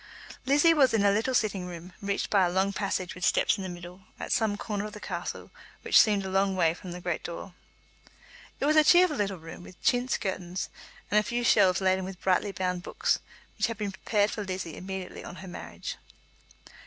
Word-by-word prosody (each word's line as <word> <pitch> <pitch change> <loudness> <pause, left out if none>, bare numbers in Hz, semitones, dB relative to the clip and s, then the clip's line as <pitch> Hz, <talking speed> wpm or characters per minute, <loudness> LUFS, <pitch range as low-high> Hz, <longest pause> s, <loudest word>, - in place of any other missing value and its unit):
Lizzie 295 +4 +5
was 265 -7 +4
in 205 -2 +2
a 200 - +6
little 225 +6 +1
sitting 200 -6 0
room, 175 +1 -9
reached 200 -1 -2
by 200 -2 +5
a 180 - +2
long 190 +2 +1
passage 190 -2 -2
with 180 - -9
steps - - +3
in - - -5
the 190 - -4
middle, 175 +1 -9 0.2
at - - -5
some 220 -3 +1
corner 205 -1 -3
of 210 - -7
the 210 - -8
castle - - -5 0.3
which - - +6
seemed 205 -3 +2
a - - -3
long 195 0 +2
way 165 -3 +3
from 180 +1 -9
the 175 - -6
great 175 -2 -3
door. 175 +2 -7 1.1
It - - 0
was 305 +1 +3
a 310 - +7
cheerful 350 0 +5
little 200 -2 -1
room, 165 +1 -10
with 180 0 -13
chintz 245 0 +2
curtains, 185 -2 -4 0.4
and 210 - +5
a - - 0
few 240 +2 -2
shelves 185 -5 +4
laden 190 0 +2
with 185 -1 -7
brightly 190 +2 +1
bound 180 -2 -2
books, - - 0 0.4
which - - +3
had 230 -2 -5
been 205 -2 -3
prepared 205 +2 0
for 210 - -4
Lizzie 185 -4 -5
immediately 190 0 -6
on 175 - -8
her 190 - -10
marriage. 85 - -7
195 Hz, 215 wpm, -28 LUFS, 180-210 Hz, 1.1 s, a